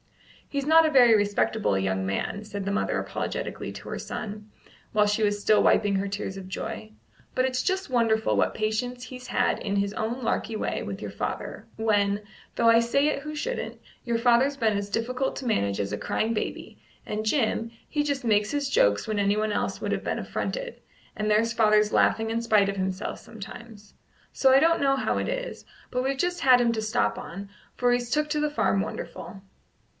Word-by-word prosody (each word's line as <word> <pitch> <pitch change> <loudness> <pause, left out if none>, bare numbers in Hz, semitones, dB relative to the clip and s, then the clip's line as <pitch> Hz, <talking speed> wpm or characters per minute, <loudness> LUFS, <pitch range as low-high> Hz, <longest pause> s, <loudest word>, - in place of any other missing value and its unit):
"He's 280 -1 -2
not 320 +2 +6
a 310 - +2
very 245 -5 +7
respectable 200 - +1
young 95 0 -1
man," 195 - -2
said 205 -2 -6
the 200 - -1
mother 205 - 0
apologetically - - -4
to - - -9
her - - -4
son, 210 0 -6 0.4
while 210 -1 +4
she 210 +2 0
was 205 0 +1
still 210 +1 +4
wiping 205 -1 +3
her 195 +1 0
tears 200 -1 -4
of 190 -1 -8
joy; 110 - -5 0.4
"but 255 - +2
it's 255 -1 0
just 380 +1 -1
wonderful 225 -3 +2
what - - +1
patience 245 +4 -2
he's 255 -1 -9
had - - +1
in 200 -1 -2
his 200 0 0
own 235 +4 -3
larky 225 -1 -1
way - - -2
with - - -6
your - - -5
father, - - -5
when, 205 -2 +1 0.3
though 230 - +2
I 230 0 +7
say 275 +5 +2
it 280 - -2
who 305 +1 -6
shouldn't, - - -4 0.2
your 235 -2 0
father's 245 +4 +3
been 220 -5 +2
as 200 0 -3
difficult 250 +5 -1
to 265 - -6
manage 100 - 0
as 100 0 -2
a - - -1
crying 220 - -1
baby, 215 - -4 0.3
and 215 +1 -3
Jim, 230 -2 0 0.2
he 295 -1 0
just 280 -3 -2
makes 210 -2 +3
his 285 -1 -1
jokes 100 - +3
when 215 -1 -1
anyone 210 +2 +1
else - - -2
would - - -3
have - - -3
been - - -2
affronted, - - -4 0.3
and 215 0 -1
there's 225 +2 +3
father 215 -2 +5
laughing 225 0 +2
in 230 +1 0
spite 215 -4 +3
of 200 - -2
himself 190 0 -3
sometimes. 215 -1 -11 0.4
So 265 - +4
I 265 - +7
don't 330 +3 +3
know 275 -1 +3
how - - 0
it - - -2
is, - - -4 0.3
but 250 0 0
we've 270 +1 -1
just 355 +4 -1
had 255 -2 +6
him 240 -1 +3
to 220 - -2
stop 105 - 0
on, 195 +3 -8 0.3
for 245 -1 +2
he's 245 -1 -1
took 300 +3 +1
to 300 - +1
the 300 - +1
farm 245 -9 +1
wonderful." 195 0 -7
225 Hz, 205 wpm, -26 LUFS, 205-255 Hz, 0.4 s, very